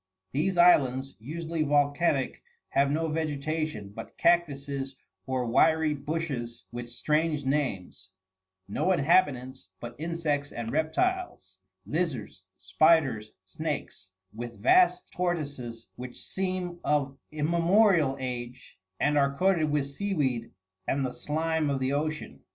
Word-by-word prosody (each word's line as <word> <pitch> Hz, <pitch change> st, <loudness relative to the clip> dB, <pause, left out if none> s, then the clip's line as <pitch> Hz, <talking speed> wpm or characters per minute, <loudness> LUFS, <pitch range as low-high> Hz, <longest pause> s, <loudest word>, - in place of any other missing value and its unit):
These 175 Hz, +7 st, 0 dB
islands, 135 Hz, -6 st, +4 dB
usually 160 Hz, +6 st, -4 dB
volcanic, 145 Hz, -1 st, +1 dB, 0.3 s
have 140 Hz, 0 st, +2 dB
no 160 Hz, +3 st, 0 dB
vegetation 155 Hz, -6 st, -2 dB
but 115 Hz, +3 st, -10 dB
cactuses 140 Hz, -5 st, +1 dB, 0.3 s
or 130 Hz, -1 st, 0 dB
wiry 160 Hz, +6 st, +3 dB
bushes 140 Hz, -6 st, -4 dB
with 120 Hz, 0 st, -6 dB
strange 150 Hz, +4 st, 0 dB
names; 125 Hz, -10 st, -2 dB, 0.6 s
no 145 Hz, -, 0 dB
inhabitants 140 Hz, -, +1 dB
but 120 Hz, 0 st, -7 dB
insects 155 Hz, -3 st, -1 dB
and 115 Hz, -1 st, -4 dB
reptiles 160 Hz, -, -1 dB, 0.3 s
lizards, 140 Hz, -, -2 dB, 0.2 s
spiders, 145 Hz, -10 st, +3 dB
snakes, 95 Hz, 0 st, -5 dB, 0.2 s
with 120 Hz, +1 st, -7 dB
vast 365 Hz, 0 st, +4 dB
tortoises 145 Hz, -10 st, -3 dB
which 125 Hz, 0 st, -7 dB
seem 185 Hz, -2 st, -3 dB
of 140 Hz, -2 st, +1 dB, 0.2 s
immemorial 170 Hz, 0 st, +3 dB
age, 125 Hz, -1 st, -6 dB, 0.2 s
and 150 Hz, +1 st, +3 dB
are 140 Hz, 0 st, +1 dB
coated 180 Hz, -4 st, +3 dB
with 145 Hz, -2 st, +1 dB
seaweed 140 Hz, -7 st, -1 dB, 0.4 s
and 135 Hz, 0 st, +1 dB
the 125 Hz, -, -3 dB
slime 160 Hz, 0 st, -1 dB
of 140 Hz, -1 st, 0 dB
the 130 Hz, +1 st, 0 dB
ocean. 155 Hz, +2 st, -3 dB
145 Hz, 115 wpm, -28 LUFS, 130-165 Hz, 0.6 s, islands